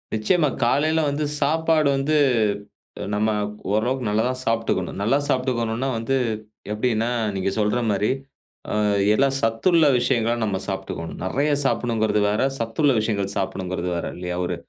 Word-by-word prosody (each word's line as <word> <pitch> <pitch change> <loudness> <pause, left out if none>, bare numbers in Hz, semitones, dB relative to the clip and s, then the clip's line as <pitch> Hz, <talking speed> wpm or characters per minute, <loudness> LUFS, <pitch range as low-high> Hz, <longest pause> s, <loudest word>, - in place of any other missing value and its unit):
நிச்சயமா. 145 +8 +2 0.2
காலைல 155 +6 +2
வந்து 145 +2 -2 0.2
சாப்பாடு 160 0 +2
வந்து, 145 +3 +1 1.0
நம்ம 105 +1 +1 0.4
ஓரளவுக்கு 120 +4 0
நல்லா 110 +2 +1
தான் 130 0 -3
சாப்பிட்டுக்கணும். 115 -5 -1
நல்லா 115 +7 +3
சாப்பிட்டுக்கணும்னா, 125 -1 0
வந்து 115 +4 -1 0.6
எப்பிடீன்னா, 115 +1 0 0.3
நீங்க 95 0 0
சொல்ற 105 +3 +1
மாரி 105 +3 +1 0.6
அ - - -1 0.4
எல்லா 135 +6 +3
சத்துள்ள 150 +9 +3
விஷயங்கள 115 -1 +1
நம்ம 100 -3 0
சாப்பிட்டுக்கணும். 95 -4 -5
நெறைய 140 +10 0
சாப்பிடணும்ங்கிறது 110 -5 +1
வேற, 105 - 0 0.2
சத்துள்ள 115 +6 +1
விஷயங்கள் 100 -3 -1
சாப்பிடணும்ங்கிறது 95 -2 -2
வேற, 85 - -3
இல்லையா? 90 0 -4
ஒரு 90 - -2
115 Hz, 130 wpm, -23 LUFS, 105-135 Hz, 1.0 s, நல்லா